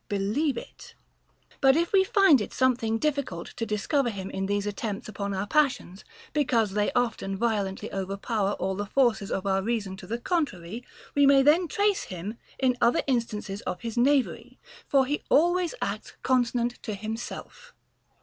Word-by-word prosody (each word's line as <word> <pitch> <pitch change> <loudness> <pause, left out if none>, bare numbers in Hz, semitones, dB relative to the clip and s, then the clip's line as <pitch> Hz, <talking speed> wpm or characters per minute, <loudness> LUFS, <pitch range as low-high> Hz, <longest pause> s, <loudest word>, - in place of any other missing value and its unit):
Believe 215 +9 0
it. - - -10 0.7
But 270 0 +6
if 340 +3 0
we 385 -1 +6
find 380 - +5
it - - -5
something 240 -4 +2
difficult 280 - -2
to 230 -2 -3
discover 240 +5 0
him 195 -3 -6
in 190 0 -2
these 205 0 0
attempts 205 0 -4
upon 200 -2 -4
our 195 +1 -2
passions, 255 - 0 0.3
because 240 -8 +2
they 205 +1 +1
often 230 -6 -1
vio 235 +3 +2 0.2
lently 190 0 -7
overpower 195 +2 -1
all 190 0 -2
the 205 +1 -4
forces 220 -4 +2
of 190 - -2
our 195 -1 +1
reason 205 -3 -2
to - - -11
the 230 - -2
con 330 +5 +1
trary, 185 +5 -9 0.3
we 285 -1 +5
may 275 -1 +6
then 325 +5 +4
trace 405 +4 +1
him 190 +5 -6 0.2
in 255 -2 +1
other 235 - +3
instances 215 -6 -2
of 180 - -4
his 230 -2 -5
knavery; 270 +2 +1 0.3
for 275 -2 +4
he 290 +3 -2
always 350 - +3
acts - - -4
consonant 245 -1 +1
to 215 - -4
himself. 225 - -7
230 Hz, 170 wpm, -27 LUFS, 200-275 Hz, 0.7 s, But